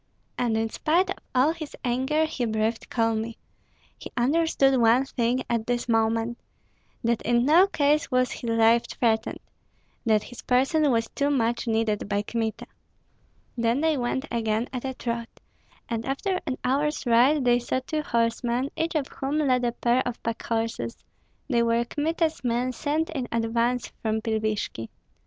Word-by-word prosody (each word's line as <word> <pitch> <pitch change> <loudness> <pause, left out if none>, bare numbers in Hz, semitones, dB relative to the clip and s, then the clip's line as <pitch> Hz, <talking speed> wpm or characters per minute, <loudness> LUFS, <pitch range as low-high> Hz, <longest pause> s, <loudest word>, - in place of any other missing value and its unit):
And 230 -3 0
in 225 0 +1
spite 345 +5 +1
of - - -4 0.2
all 260 +5 +4
his 315 -3 -8
anger 265 +6 +1
he 285 -6 -2
breathed 220 +1 -1
calmly; 225 -1 -1 0.6
he - - -8
understood 270 -1 +3
one 235 +4 +4
thing 250 -1 0
at 230 -2 -1
this 245 0 -1
moment, 225 +1 +1 0.6
that 235 0 +1
in 240 +1 +2
no 335 +7 +6
case 300 -3 +1
was 255 -1 +2
his 235 - -5
life 230 +1 +4
threatened, 220 -2 0 0.7
that 215 -2 +3
his 245 - -10
person 270 +4 +2
was 230 -2 +1
too 285 0 0
much 235 -4 0
needed 220 -2 0
by 205 0 0
Kmita. 225 0 -3 0.9
Then 235 +3 +1
they 320 -1 +2
went 260 +1 -1
again 225 0 0
at 250 0 -4
a 265 -1 -3
trot, 235 -1 -3 0.6
and 230 -1 -2
after 365 - -1
an 260 - -2
hour's 290 +3 0
ride 250 +4 +4
they 245 0 +4
saw 245 +2 -1
two 310 -1 -1
horsemen, 235 +1 0
each 330 +1 -2
of 295 -3 +1
whom 275 +2 -3
led 255 -5 +2
a 240 - +1
pair 240 +1 +1
of 245 - -4
packhorses. 230 0 -2 0.5
They 240 -4 +2
were 235 0 +2
Kmita's 315 +1 -1
men 245 +1 0
sent 305 +6 -1
in 265 -6 -3
advance 230 +1 0
from 220 -1 0
Pilvishki. 215 - -2
240 Hz, 160 wpm, -26 LUFS, 230-275 Hz, 0.9 s, no